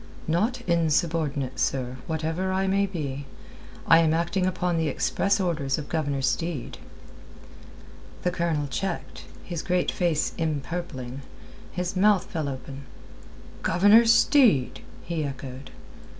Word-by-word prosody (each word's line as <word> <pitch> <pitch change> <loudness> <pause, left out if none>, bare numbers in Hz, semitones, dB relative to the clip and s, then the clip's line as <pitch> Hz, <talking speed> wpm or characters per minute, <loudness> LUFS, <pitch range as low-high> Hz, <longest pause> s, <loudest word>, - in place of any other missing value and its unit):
"Not 210 +10 0
insubordinate, 155 -5 0
sir, 130 -1 -1
whatever 160 +4 -2
I 190 +1 0
may 200 +1 +2
be. 145 -7 -5 0.6
I 165 - +7
am 160 -1 +3
acting 175 +3 0
upon 180 -2 0
the 160 -1 +1
express 200 +7 +1
orders 155 -8 0
of 150 -2 -6
Governor 145 -4 -1
Steed." 160 +1 -2 1.4
The 180 - +1
Colonel 170 -4 -1
checked, 170 +6 -4 0.2
his 170 -3 -4
great 180 -1 0
face 170 -4 0
empurpling. 150 -4 -3 0.5
His 180 +2 -3
mouth 195 0 +4
fell 155 -5 -3
open. 135 +1 -8 0.8
"Governor 205 +7 +5
Steed!" 230 - +4 0.2
he 170 -2 -2
echoed. 135 -1 -7
165 Hz, 120 wpm, -26 LUFS, 140-180 Hz, 1.4 s, I